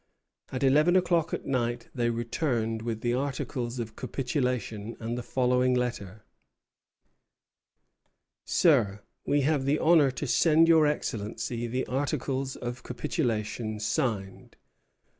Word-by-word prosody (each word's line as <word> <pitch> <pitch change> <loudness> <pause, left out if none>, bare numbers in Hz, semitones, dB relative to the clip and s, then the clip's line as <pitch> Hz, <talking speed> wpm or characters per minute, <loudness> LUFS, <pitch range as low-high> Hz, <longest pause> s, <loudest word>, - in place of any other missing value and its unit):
At 130 +1 -3
eleven 150 +6 +4
o'clock 170 -3 +2
at - - -4
night 120 -2 -1
they 120 -2 0
returned 115 -1 -1
with 115 -1 -4
the 120 0 0
articles 130 -2 -3
of 115 -2 -5
capitulation 125 -5 -3
and 115 +1 -3
the 125 - -3
following 125 +1 +1
letter: 110 -5 -3 2.2
Sir, 110 - +2 0.2
We 145 0 +3
have 140 -1 +1
the 140 +2 +2
honor 160 -4 +5
to 130 +3 -4
send 160 +4 +4
your 160 -2 +6
Excellency 115 -3 -3
the 125 +3 -2
articles 135 0 -2
of 120 +1 -6
capitulation 115 -6 -2
signed. 110 -4 -2
125 Hz, 120 wpm, -28 LUFS, 115-140 Hz, 2.2 s, your